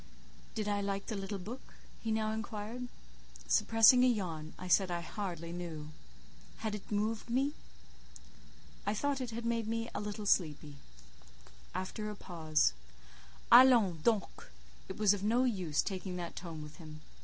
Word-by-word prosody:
"Did 215 -2 -2
I 205 -1 0
like 200 0 -2
the 220 - -4
little 195 0 -4
book?" 220 +8 -9 0.2
he 225 - -3
now 220 0 +1
inquired. 220 +2 -5 0.6
Suppressing 225 - +6
a - - +6
yawn, 170 -9 -2
I 185 - -7
said 185 +1 +4
I 175 -1 -2
hardly 170 -2 -5
knew. 165 -3 -6 0.7
"Had 220 -1 -3
it 210 0 -7
moved 215 +2 -1
me?" 270 +4 +1 1.3
"I 205 - -1
thought 280 +4 0
it 250 - -3
had 230 +1 -5
made 230 -2 0
me 230 +1 -2
a - - -2
little 210 0 -5
sleepy." 150 -6 +1 1.0
(After 185 +3 -3
a 210 - -5
pause:) 160 - +1 0.8
"Allons 235 -9 +7
donc! 215 0 0 0.4
It 190 - -6
was 210 -2 +5
of 200 -1 -4
no 235 +4 +3
use 185 - 0
taking 190 -2 -4
that 175 -1 -5
tone 165 -3 -6
with 150 +1 -11
him. 155 -3 -10
205 Hz, 155 wpm, -33 LUFS, 175-225 Hz, 1.3 s, Allons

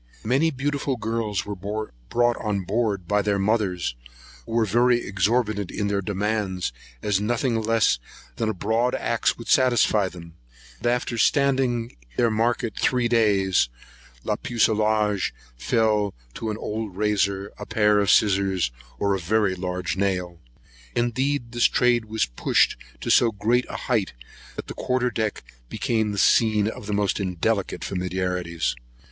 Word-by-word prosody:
Many 135 +8 +2
beautiful 140 -1 -2
girls 110 -3 -2
were 105 - -4
brought 105 - -1
on 105 -2 -2
board 105 0 0
for - - -22
sale - - -24
by 105 +2 +2
their 100 0 0
mothers, 95 - 0 0.5
who - - -6
were 115 -1 +3
very 120 +4 +3
exorbitant 105 0 0
in 100 -1 -2
their 100 -1 0
demands, 100 - -2 0.3
as 105 -1 +1
nothing 115 +1 0
less 110 - +2 0.4
than 110 - 0
a - - 0
broad 110 +6 +1
axe - - 0
would - - -10
satisfy 120 -6 +3
them; 85 -2 -12 0.5
but - - +1
after 120 -1 -2
standing 130 -3 +1 0.2
their 120 -2 +3
market 115 +1 0
three 125 -2 +2
days, 100 - +3 0.5
la - - -1
pucelage 110 -3 +1 0.2
fell 105 - +1 0.2
to 110 - -4
an 105 - -3
old 105 -3 -5
razor, 100 -2 0
a - - -7
pair 105 -1 +3
of 100 -2 +1
scissors, 95 - +3 0.3
or 100 +8 +1
a 95 - -1
very 100 +2 +1
large 90 0 -3
nail. 90 -3 -1 0.6
Indeed 120 +1 0
this 120 0 +2
trade 120 -2 +3
was 110 0 0
pushed - - +2 0.3
to - - -1
so 115 - +5
great 115 +5 +1
a - - -4
height, 110 -7 0 0.4
that - - -6
the - - -7
quarter 125 -1 0
deck 110 -3 -2 0.3
became 110 -2 0
the 100 - -4
scene 105 0 +4
of 110 -2 -6
the 105 - -2
most 100 0 +1
indelicate 95 -1 -1
familiarities. 90 -4 -2
105 Hz, 155 wpm, -24 LUFS, 95-115 Hz, 0.6 s, so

